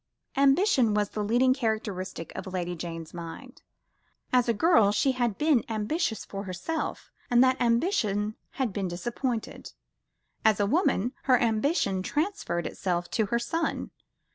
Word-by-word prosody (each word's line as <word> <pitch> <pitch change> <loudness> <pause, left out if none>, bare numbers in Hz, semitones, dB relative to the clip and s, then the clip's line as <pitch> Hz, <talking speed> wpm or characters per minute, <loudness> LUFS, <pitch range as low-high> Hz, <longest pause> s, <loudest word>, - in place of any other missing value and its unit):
Ambition 275 - +4
was 205 -1 +1
the 210 - -3
leading 245 +5 +3
characteristic 210 - -3
of - - -6
Lady 180 -1 -2
Jane's 165 -1 -7
mind. 175 +10 -9 0.7
As 250 -1 +4
a - - +6
girl, 225 - +4
she 265 +6 +2
had 240 -5 -1
been 300 -6 +3
ambitious 220 - -1
for 195 0 -6
herself, 190 - -4 0.2
and 245 +1 +6
that 260 0 +2
ambition 230 - +1 0.2
had 255 -7 -1
been 195 -1 -2
disappointed; 230 +6 -4 0.7
as 215 -2 +4
a 205 - +3
woman, 250 - +1
her 255 -2 +5
ambition 220 - +1
transferred 295 - -2
itself 175 -2 -2
to 220 -3 +1
her 235 - +1
son. 325 +7 -2
225 Hz, 140 wpm, -27 LUFS, 195-260 Hz, 0.7 s, a